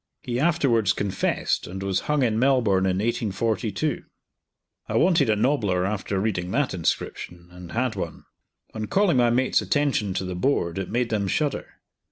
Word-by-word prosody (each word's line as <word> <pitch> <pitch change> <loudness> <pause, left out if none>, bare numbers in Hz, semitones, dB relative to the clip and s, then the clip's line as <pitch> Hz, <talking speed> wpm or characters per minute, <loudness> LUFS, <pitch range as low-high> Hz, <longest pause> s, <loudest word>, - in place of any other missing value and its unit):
He 120 0 -2
afterwards 135 - +2
confessed, 100 -2 -1
and 95 +2 -6
was 95 -1 0
hung 150 -2 +2
in 110 -2 +1
Melbourne 115 -8 +3
in 95 0 0
1842." 115 +4 -1 0.9
I - - -2
wanted 165 -8 +3
a 110 - +4
nobbler 105 -7 +1
after 100 -1 -2
reading 95 -4 -1
that 140 +7 0
inscription, 85 0 -3
and 90 -1 -11
had 120 -1 0
one. 85 -5 -5 0.5
On 110 -1 -4
calling 195 -8 +2
my 120 -1 +4
mates' 130 +2 +2
attention 135 -10 0
to 95 - -2
the 90 - -4
board, 90 -4 0
it 95 - -4
made 120 0 -1
them 100 -3 0
shudder. 145 +8 -2
110 Hz, 165 wpm, -24 LUFS, 95-130 Hz, 0.9 s, a